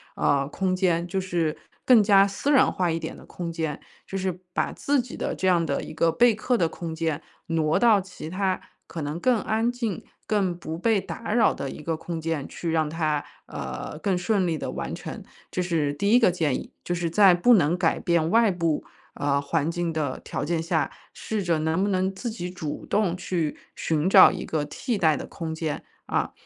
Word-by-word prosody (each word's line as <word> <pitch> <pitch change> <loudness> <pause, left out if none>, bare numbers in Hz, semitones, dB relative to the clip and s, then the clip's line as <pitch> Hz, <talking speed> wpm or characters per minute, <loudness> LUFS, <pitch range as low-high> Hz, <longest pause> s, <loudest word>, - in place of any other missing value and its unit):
呃， 140 -1 +2
空 185 +4 -1
间， 175 -2 +1
就 190 +2 -1
是 170 -4 -1 0.3
更 245 -4 +7
加 200 -1 +6
私 200 +8 -1
人 270 -3 +5
化 180 -2 0
一 165 - 0
点 - - -6
的 - - -14
空 170 -2 -5
间， 160 -3 -3 0.3
就 195 - -4
是 185 -2 -2
把 - - 0
自 285 -2 +1
己 245 0 -9
的 - - -2
这 190 - -1
样 170 -2 +3
的 - - -1
一 - - -8
个 165 0 +3
备 240 +3 +5
课 245 +3 0
的 165 -4 +2
空 165 -1 -6
间， 160 -1 -1 0.3
挪 160 -1 +1
到 225 -4 +5
其 180 -4 -9
它 185 +1 -1 0.3
可 165 - -6
能 150 +3 -3
更 250 0 +3
安 225 +3 0
静、 230 -6 -3 0.2
更 190 -5 +1
不 160 -2 -5
被 215 +3 +2
打 210 +3 -5
扰 235 - +4
的 140 - -5
一 - - -8
个 165 -1 -1
空 165 +1 -5
间 160 -3 -2
去 165 -2 -4
让 160 -2 +1
它， 155 -2 -1 0.2
呃， 150 - -6
更 195 -1 0
顺 190 +1 +1
利 160 -2 0
地 - - -4
完 - - -4
成。 - - -7 0.3
这 180 - -1
是 160 -5 0
第 200 +8 0
一 245 - +7
个 225 - +5
建 160 -6 0
议， - - -6
就 175 - -2
是 170 -1 -1
在 195 -1 +7
不 240 +8 +5
能 175 -4 +3
改 170 -3 +1
变 170 -2 +1
外 225 +1 +4
部， 170 -4 0 0.3
呃， 140 -1 0
环 155 +2 0
境 175 -1 -2
的 145 -4 -2
条 135 - -4
件 160 +2 0
下， 165 - 0 0.2
试 220 -2 -3
着 170 -3 +1
能 160 +3 0
不 205 - +1
能 190 0 0
自 235 +5 -4
己 180 -6 -5
主 160 -5 -6
动 200 -4 +1
去 170 -4 -2 0.2
寻 160 +3 0
找 - - +9
一 - - -5
个 155 -2 -1
替 225 - -3
代 160 -5 +3
的 - - -6
空 160 -1 -5
间， 160 -2 -3 0.2
啊。 - - 0
175 Hz, 235 characters per minute, -25 LUFS, 160-195 Hz, 0.3 s, 找